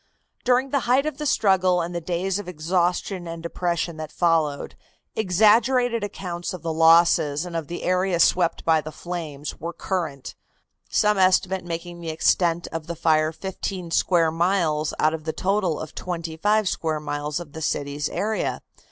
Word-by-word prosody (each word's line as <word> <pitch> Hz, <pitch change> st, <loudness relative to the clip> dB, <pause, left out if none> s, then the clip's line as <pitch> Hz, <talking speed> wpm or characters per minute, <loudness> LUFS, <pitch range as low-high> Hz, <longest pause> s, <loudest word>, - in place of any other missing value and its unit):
During 255 Hz, +2 st, +2 dB
the 280 Hz, -, +2 dB
height 265 Hz, +3 st, +4 dB
of 310 Hz, -, -4 dB
the 300 Hz, -, -1 dB
struggle 185 Hz, -6 st, +3 dB
and 175 Hz, +1 st, -3 dB
the 170 Hz, -, -3 dB
days 180 Hz, +3 st, -1 dB
of 205 Hz, -, -7 dB
exhaustion 180 Hz, +2 st, -1 dB
and 165 Hz, 0 st, -7 dB
depression 170 Hz, -1 st, -2 dB
that 155 Hz, -1 st, -6 dB
followed, 160 Hz, -4 st, 0 dB, 0.4 s
exaggerated 225 Hz, +4 st, +3 dB
accounts 180 Hz, -3 st, -5 dB
of 180 Hz, -, -11 dB
the 165 Hz, -1 st, -2 dB
losses 165 Hz, -2 st, +4 dB
and 175 Hz, -1 st, -7 dB
of 165 Hz, -3 st, -3 dB
the 175 Hz, -, -6 dB
area 185 Hz, -1 st, +1 dB
swept 170 Hz, 0 st, +2 dB
by 160 Hz, -1 st, +4 dB
the 155 Hz, +1 st, -8 dB
flames 155 Hz, -4 st, -6 dB
were 170 Hz, +2 st, -5 dB
current, 165 Hz, -6 st, -4 dB, 0.6 s
some 210 Hz, -1 st, +2 dB
estimate 185 Hz, 0 st, +3 dB
making 170 Hz, 0 st, -6 dB
the 165 Hz, -, -5 dB
extent 170 Hz, +2 st, +1 dB
of 165 Hz, -1 st, -5 dB
the 170 Hz, -, -4 dB
fire 155 Hz, -1 st, +2 dB
fifteen 185 Hz, 0 st, -5 dB
square 165 Hz, -2 st, +3 dB
miles 165 Hz, -3 st, +1 dB
out 155 Hz, +1 st, +2 dB
of 160 Hz, -1 st, -5 dB
the 160 Hz, 0 st, -3 dB
total 190 Hz, -4 st, 0 dB
of 155 Hz, -1 st, -7 dB
twenty 170 Hz, -3 st, -5 dB
five 210 Hz, +4 st, +2 dB
square 160 Hz, -3 st, -1 dB
miles 150 Hz, +1 st, -3 dB
of 160 Hz, -4 st, -10 dB
the 160 Hz, -, -7 dB
city's 145 Hz, 0 st, -2 dB
area. 215 Hz, +2 st, -2 dB
170 Hz, 170 wpm, -24 LUFS, 160-190 Hz, 0.6 s, height